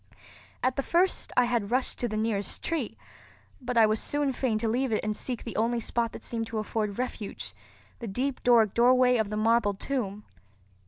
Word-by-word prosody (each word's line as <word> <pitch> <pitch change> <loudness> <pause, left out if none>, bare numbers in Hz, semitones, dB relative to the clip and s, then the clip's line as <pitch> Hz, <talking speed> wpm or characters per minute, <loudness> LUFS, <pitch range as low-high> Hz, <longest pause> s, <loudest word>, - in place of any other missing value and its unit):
At 255 +1 +1
the - - +2
first 350 +6 +1
I 250 - +6
had 235 -4 -1
rushed 255 +2 0
to 240 - 0
the 215 -1 -3
nearest 215 -2 -2
tree; 330 -2 -2 0.6
but 250 -1 -3
I 225 - +7
was 215 0 +2
soon 290 -2 +1
fain 245 -3 0
to 225 - -1
leave 250 +3 0
it 215 - 0
and 215 0 -1
seek 245 +2 -3
the 230 - -7
only 235 +2 +1
spot 230 0 -1
that - - -9
seemed 225 -1 -3
to 230 -1 -5
afford 215 -1 -2
refuge, 215 - -5 0.5
the 230 - -6
deep 255 +7 -2
Doric 230 -4 +4
doorway 250 +1 +4
of 220 -2 0
the 210 - -3
marble 220 -2 +2
tomb. 210 -3 -4
230 Hz, 200 wpm, -28 LUFS, 215-250 Hz, 0.6 s, I